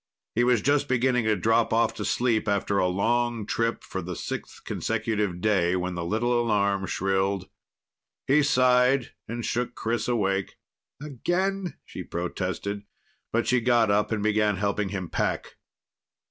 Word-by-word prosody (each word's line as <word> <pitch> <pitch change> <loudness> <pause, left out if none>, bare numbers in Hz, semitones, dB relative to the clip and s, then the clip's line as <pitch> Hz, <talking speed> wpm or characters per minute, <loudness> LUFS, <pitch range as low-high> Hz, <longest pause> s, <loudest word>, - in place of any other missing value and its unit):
He 120 - +2
was 120 -3 +3
just 145 0 +2
beginning 125 -2 +2
to 110 -1 +3
drop 115 +4 +2
off 115 0 +2
to - - -5
sleep 115 -3 +1
after 100 0 +1
a 90 - +3
long 115 +4 0
trip 115 0 -1
for 95 - -5
the 90 0 -5
sixth - - -6
consecutive 110 -5 -1
day 95 -4 +2
when 90 0 -2
the 85 -1 -3
little 120 +7 +1
alarm 100 -4 +1
shrilled. 95 0 0 0.8
He 145 +3 +4
sighed 125 -2 +3 0.2
and 115 +1 -4
shook 125 +1 -2
Chris 115 0 -2
awake. 95 -6 0 0.5
"Again?" 180 +6 -1
she - - -8
protested. 95 +3 -3 0.5
But 115 +1 +1
she 125 -1 +2
got 120 -3 +3
up 105 +2 +1
and 105 -2 -1
began 105 -1 +2
helping 100 +1 -1
him 95 -3 -4
pack. - - -2
110 Hz, 150 wpm, -26 LUFS, 100-120 Hz, 0.8 s, He